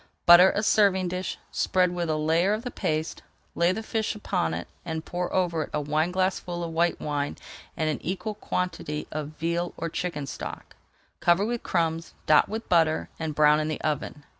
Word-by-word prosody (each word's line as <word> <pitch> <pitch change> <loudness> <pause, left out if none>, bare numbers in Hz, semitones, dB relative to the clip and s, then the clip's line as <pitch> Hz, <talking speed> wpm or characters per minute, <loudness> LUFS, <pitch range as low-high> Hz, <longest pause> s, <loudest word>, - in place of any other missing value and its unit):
Butter 175 +2 +9
a 205 - 0
serving 190 -4 +3
dish, 185 +1 -3
spread 180 -1 +2
with 175 -2 -2
a 155 - +1
layer 165 +6 +2
of 215 +2 -3
the 245 - -4
paste, 155 +1 -2 0.3
lay 170 +1 +3
the 220 +4 -3
fish 220 0 -1
upon 80 - -1
it, 85 - -5 0.2
and 160 -1 -4
pour 180 0 -3
over 175 -4 +1
it - - -19
a - - +1
wineglassful 175 +4 -1
of 165 - -4
white 170 +1 +1
wine 145 -1 -2 0.4
and 160 - 0
an 155 - -1
equal 195 +4 -3
quantity 180 -7 -3
of 155 0 -5
veal 170 +2 -2
or 165 - -3
chicken 160 -4 -3
stock. - - -7 0.4
Cover 175 +4 +3
with 235 +1 -2
crumbs, 165 -1 -1
dot 155 - +5
with 220 +2 -5
butter, 165 -3 +2
and 160 -2 -3
brown 150 0 +5
in 155 - -1
the 155 - -3
oven. 150 -1 -3
170 Hz, 190 wpm, -26 LUFS, 155-185 Hz, 0.4 s, Butter